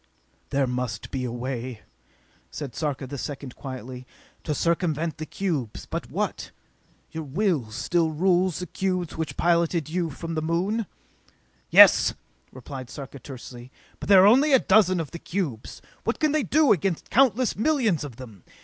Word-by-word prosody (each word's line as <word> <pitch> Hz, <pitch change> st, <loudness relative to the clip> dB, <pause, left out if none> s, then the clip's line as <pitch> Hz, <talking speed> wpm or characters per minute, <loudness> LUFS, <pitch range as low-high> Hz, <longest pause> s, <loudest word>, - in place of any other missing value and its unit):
"There 140 Hz, 0 st, +1 dB
must 125 Hz, -3 st, -4 dB
be 130 Hz, -2 st, -2 dB
a 120 Hz, -, -3 dB
way," 125 Hz, -1 st, -5 dB, 0.7 s
said 140 Hz, -5 st, -6 dB
Sarka 145 Hz, -2 st, -3 dB
the 140 Hz, +1 st, -7 dB
Second 140 Hz, -3 st, -6 dB
quietly, 130 Hz, -1 st, -8 dB, 0.4 s
"to 150 Hz, -, -2 dB
circumvent 165 Hz, -1 st, 0 dB
the 155 Hz, -, -5 dB
cubes! 155 Hz, -, -3 dB
But -, -, -5 dB
what? -, -, -3 dB, 0.6 s
Your 160 Hz, 0 st, -5 dB
will 155 Hz, -, 0 dB
still 165 Hz, +9 st, 0 dB
rules 180 Hz, +2 st, +2 dB
the 180 Hz, -, -4 dB
cubes 185 Hz, -2 st, -2 dB
which 160 Hz, -1 st, -4 dB
piloted 170 Hz, -2 st, +1 dB
you 170 Hz, 0 st, -1 dB
from 165 Hz, +3 st, -6 dB
the 155 Hz, -, -1 dB
Moon?" 185 Hz, +7 st, -1 dB, 0.8 s
"Yes," -, -, +7 dB, 0.4 s
replied 130 Hz, 0 st, -9 dB
Sarka 140 Hz, 0 st, -9 dB
tersely, 125 Hz, -2 st, -10 dB, 0.3 s
"but -, -, -7 dB
there 190 Hz, -2 st, +8 dB
are -, -, +7 dB
only 270 Hz, +8 st, +5 dB
a -, -, +9 dB
dozen 190 Hz, -4 st, +4 dB
of 160 Hz, -4 st, -4 dB
the 170 Hz, -, -7 dB
cubes. 160 Hz, -, -4 dB, 0.2 s
What -, -, -1 dB
can 310 Hz, -2 st, +2 dB
they 310 Hz, 0 st, +2 dB
do 285 Hz, -, +3 dB
against 185 Hz, -2 st, 0 dB
countless 255 Hz, -1 st, +3 dB
millions 225 Hz, -, +1 dB
of 140 Hz, -5 st, -7 dB
them? 115 Hz, -7 st, -12 dB
160 Hz, 160 wpm, -25 LUFS, 130-185 Hz, 0.8 s, a